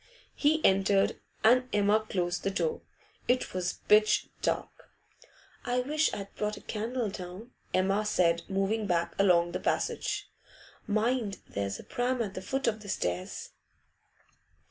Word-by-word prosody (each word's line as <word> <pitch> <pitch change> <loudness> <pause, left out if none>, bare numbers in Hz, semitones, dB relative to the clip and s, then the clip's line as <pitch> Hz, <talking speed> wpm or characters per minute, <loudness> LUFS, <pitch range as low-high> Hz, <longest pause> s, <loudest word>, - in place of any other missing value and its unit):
He 310 +2 +2
entered, 195 0 +3 0.2
and 250 +3 +5
Emma 205 +1 +4
closed 175 -2 -1
the - - +1
door. 465 - -1 0.5
It 250 +1 +1
was 180 -1 -2
pitch 215 0 +4
dark. - - -3 0.7
'I 250 0 +1
wish 305 +4 +1
I'd 200 -1 -6
brought 210 0 -2
a - - -10
candle 230 +2 -2
down,' 190 +5 -8 0.2
Emma 195 +3 +2
said, 170 -5 +2
moving 200 +3 0
back 170 -2 0
along 175 -3 +4
the - - -3
passage. - - -1 0.6
'Mind 215 0 0
there's 100 0 -3
a - - -10
pram 250 +1 -1
at 200 -3 -5
the 185 - -5
foot 270 +7 -2
of 220 -2 0
the 205 - -9
stairs. 90 - -3
205 Hz, 145 wpm, -30 LUFS, 185-240 Hz, 0.7 s, and